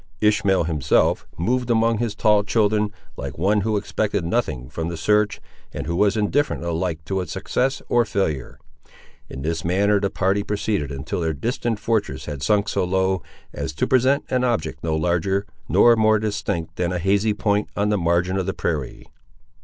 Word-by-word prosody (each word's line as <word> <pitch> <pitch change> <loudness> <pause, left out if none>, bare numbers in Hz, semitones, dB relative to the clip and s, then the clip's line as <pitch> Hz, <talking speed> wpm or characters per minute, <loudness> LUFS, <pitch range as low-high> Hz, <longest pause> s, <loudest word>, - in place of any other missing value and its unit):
Ishmael, 105 -3 +3
himself, 75 -4 +1
moved 125 +8 0
among 115 -1 +2
his 115 -3 -2
tall 105 -1 +3
children, 105 -1 +1 0.3
like - - -6
one 100 +6 +2
who 110 +1 0
expected 100 -1 -1
nothing 75 - -1
from 80 +5 -4
the 85 - -5
search, 105 +5 +2 0.4
and - - -4
who 85 +2 -2
was 105 +3 +2
indifferent 130 +6 0
alike 85 -1 -2
to 95 +2 -1
its 90 -4 -6
success 135 - -1
or 120 0 +3
failure. 95 - -2 0.7
In 65 - -7
this 80 0 -2
manner 100 +4 +2
the 100 0 0
party 95 +2 +1
proceeded 100 -6 -2
until 70 +4 -4
their 80 -1 0
distant 115 - -2
fortress 105 - -1
had 75 -3 -6
sunk 105 +4 +2
so - - 0
low, 95 0 +1 0.3
as - - -4
to - - 0
present 130 +2 +2
an 125 -1 +2
object 80 - -1
no 80 -1 0
larger 90 +5 0 0.2
nor 120 -1 +6
more 110 -1 +4
distinct 100 -6 -3
than 90 -1 0
a 90 - -1
hazy 100 +4 +1
point, 105 0 0
on 105 +1 +1
the 105 - +2
margin 85 +2 +1
of 95 -1 -2
the 95 - -2
prairie. 75 -6 -3
100 Hz, 180 wpm, -22 LUFS, 85-110 Hz, 0.7 s, nor